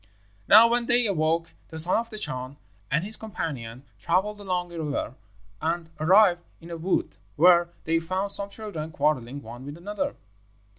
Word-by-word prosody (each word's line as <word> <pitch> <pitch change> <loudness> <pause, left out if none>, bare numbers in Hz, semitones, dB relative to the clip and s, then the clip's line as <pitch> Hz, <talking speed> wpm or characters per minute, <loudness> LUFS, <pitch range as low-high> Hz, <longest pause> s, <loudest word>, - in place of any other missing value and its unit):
"Now 220 +3 +9
when 240 0 0
they 240 0 +4
awoke 165 -3 0 0.2
the 160 - -9
son 165 +3 +3
of 230 +1 -2
the 215 - -8
Chan 130 -6 -3 0.3
and 150 +5 +1
his 215 +3 -2
companion 135 - -5 0.2
travelled 205 - 0
along 180 -3 -2
a 165 - -4
river 145 -5 -3 0.5
and 165 +1 -2
arrived 180 +2 +5 0.2
in 170 +1 -12
a 170 - -4
wood, 165 - -1 0.2
where 175 +1 +5
they 165 +1 +1
found 185 +4 -2
some 200 0 -1
children 200 -7 -5
quarrelling 140 -3 -1
one 120 +2 -10
with 145 +3 -8
another. 210 +10 -3
170 Hz, 165 wpm, -26 LUFS, 155-200 Hz, 0.5 s, Now